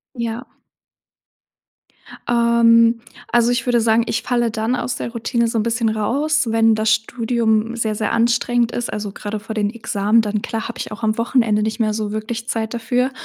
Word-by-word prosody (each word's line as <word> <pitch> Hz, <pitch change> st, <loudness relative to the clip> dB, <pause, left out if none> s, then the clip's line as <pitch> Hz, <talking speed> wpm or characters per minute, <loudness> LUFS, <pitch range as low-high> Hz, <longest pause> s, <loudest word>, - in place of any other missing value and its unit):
Ja. 235 Hz, +1 st, -4 dB, 1.8 s
Ähm, 235 Hz, -1 st, +4 dB, 0.3 s
also 240 Hz, 0 st, +3 dB
ich 245 Hz, -, -1 dB
würde 240 Hz, -2 st, +3 dB
sagen: 225 Hz, +1 st, +3 dB
„Ich 225 Hz, -, -1 dB
falle 240 Hz, -2 st, +1 dB
dann 220 Hz, +3 st, -1 dB
aus 245 Hz, 0 st, -3 dB
der 235 Hz, -, -5 dB
Routine 235 Hz, 0 st, -1 dB
so 225 Hz, -, -2 dB
'n 215 Hz, -, +1 dB
bisschen 230 Hz, 0 st, 0 dB
raus, 265 Hz, +8 st, 0 dB
wenn 225 Hz, 0 st, +4 dB
das 215 Hz, 0 st, 0 dB
Studium 225 Hz, 0 st, 0 dB
sehr, 220 Hz, -2 st, -1 dB
sehr 215 Hz, -, -1 dB
anstrengend 240 Hz, 0 st, +1 dB
ist“, 240 Hz, -, -3 dB
also 205 Hz, -1 st, -4 dB
grade 210 Hz, +1 st, -5 dB
vor 220 Hz, +1 st, -7 dB
den 205 Hz, -1 st, 0 dB
Examen, 220 Hz, -1 st, +1 dB
dann 210 Hz, -1 st, -2 dB
klar 225 Hz, +1 st, -4 dB
habe 235 Hz, -, -8 dB
ich -, -, -5 dB
auch 220 Hz, +2 st, -8 dB
am 215 Hz, 0 st, +1 dB
Wochenende 230 Hz, -3 st, +2 dB
nicht 220 Hz, +2 st, -3 dB
mehr 215 Hz, -2 st, +1 dB
so 210 Hz, -1 st, -3 dB
wirklich 225 Hz, +2 st, -4 dB
Zeit 225 Hz, 0 st, -2 dB
dafür. 250 Hz, +3 st, 0 dB
230 Hz, 185 wpm, -20 LUFS, 220-235 Hz, 1.8 s, Ähm